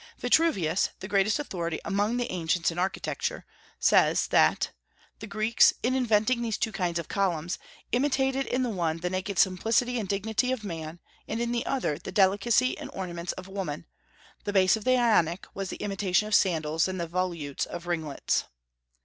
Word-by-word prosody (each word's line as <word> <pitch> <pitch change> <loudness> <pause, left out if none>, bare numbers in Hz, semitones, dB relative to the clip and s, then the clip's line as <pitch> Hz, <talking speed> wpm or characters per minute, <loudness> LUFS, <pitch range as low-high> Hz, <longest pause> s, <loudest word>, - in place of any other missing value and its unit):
Vitruvius, 200 - +2
the 190 - -6
greatest 200 +1 +2
authority 170 - -3
among 205 +4 0
the 245 0 -2
ancients 170 -1 0
in 170 - -5
architecture, 185 +2 -2 0.3
says - - +4
that - - +3 0.5
"the 220 - -7
Greeks, 215 +2 +4
in 250 +2 +2
inventing 235 -1 +2
these 225 -2 -1
two 220 - -1
kinds 180 -4 -1
of 170 - -4
columns, 175 -4 -1 0.3
imitated 265 +1 +1
in 255 +1 0
the 245 - -1
one 170 -5 -1
the 180 +2 -3
naked 190 +1 -3
simplicity 225 +7 +2
and 200 -4 -4
dignity 220 +5 0
of 255 -4 -3
man, 165 -3 -6 0.3
and 225 - -3
in 235 0 -1
the 240 -1 -2
other 250 - -1
the - - -7
delicacy 205 +6 +3
and - - -7
ornaments 175 -2 -4
of 185 0 -9
woman; 190 -6 -5 0.6
the 205 - -2
base 190 -1 +4
of 220 - -7
the 255 0 +4
Ionic 195 -8 +2
was 195 -1 -4
the - - -5
imitation 195 0 0
of 215 - -4
sandals, 160 -4 +2
and 185 -1 -4
the 170 - -1
volutes 170 -5 -2
of 175 0 -7
ringlets." 160 -5 -1
195 Hz, 175 wpm, -27 LUFS, 175-225 Hz, 0.6 s, says